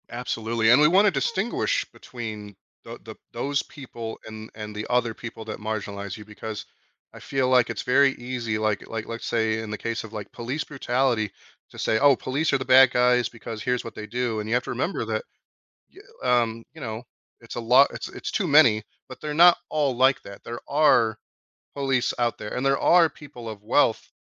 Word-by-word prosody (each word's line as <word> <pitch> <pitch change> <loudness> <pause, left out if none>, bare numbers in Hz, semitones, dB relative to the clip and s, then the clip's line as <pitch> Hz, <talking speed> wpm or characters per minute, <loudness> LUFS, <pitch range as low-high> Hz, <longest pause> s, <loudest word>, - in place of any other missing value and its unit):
Absolutely, 115 -2 -1
and 125 +5 +7
we 150 - +7
want 190 +6 +5
to 205 - +4
distinguish 485 - -1
between 110 -4 -8 0.3
the - - -9
the - - -10 0.2
those 140 +1 -1
people 120 -5 -8
and 110 0 -9
and 105 -1 -7
the 105 +1 -4
other 120 -2 +1
people 115 -1 -9
that 110 - -6
marginalize 100 -2 -5
you 105 - -11
because 105 0 -7 0.5
I - - -11
feel 135 -2 -1
like 125 -2 +4
it's 115 -4 -3
very 135 +2 +4
easy, 120 -3 -4
like 110 -2 -1
like, 110 -1 -5
let's 115 0 -6
say 110 -1 0
in 110 -1 -6
the 105 - -4
case 115 +1 -3
of 110 - -10
like 105 -2 -7
police 130 +6 -4
brutality 125 -6 0 0.4
to - - -14
say, 110 - +1
"Oh, 140 -1 +6
police 140 +6 -1
are - - +4
the 130 - -5
bad 130 0 +7
guys 125 -1 +3
because 115 -2 -8
here's 125 -1 0
what 115 - -8
they 105 - -7
do", 120 -2 -2
and 105 +1 -5
you 115 - +2
have 125 - +1
to - - -4
remember 130 +2 -2
that, 110 -1 -2 1.0
y 125 -1 +4
um, 115 0 -5
you 160 - -12
know, 110 -3 -5 0.4
it's 115 - -10
a - - -2
lot 125 +4 +5
it's - - -6
it's - - -6
too 200 - 0
many, 130 -8 +6 0.3
but 130 - -11
they're 150 -1 -4
not 175 +2 +7
all 145 -4 0
like 130 +2 +3
that. 100 0 -11
There 120 0 -6
are 120 -7 +3 0.6
police 135 -3 0
out 120 -1 0
there, 105 0 -6
and 125 - -2
there 135 0 +3
are 170 -2 +5
people 130 -6 -11
of 105 -2 -8
wealth 110 +1 +2
120 Hz, 210 wpm, -25 LUFS, 110-135 Hz, 1.0 s, and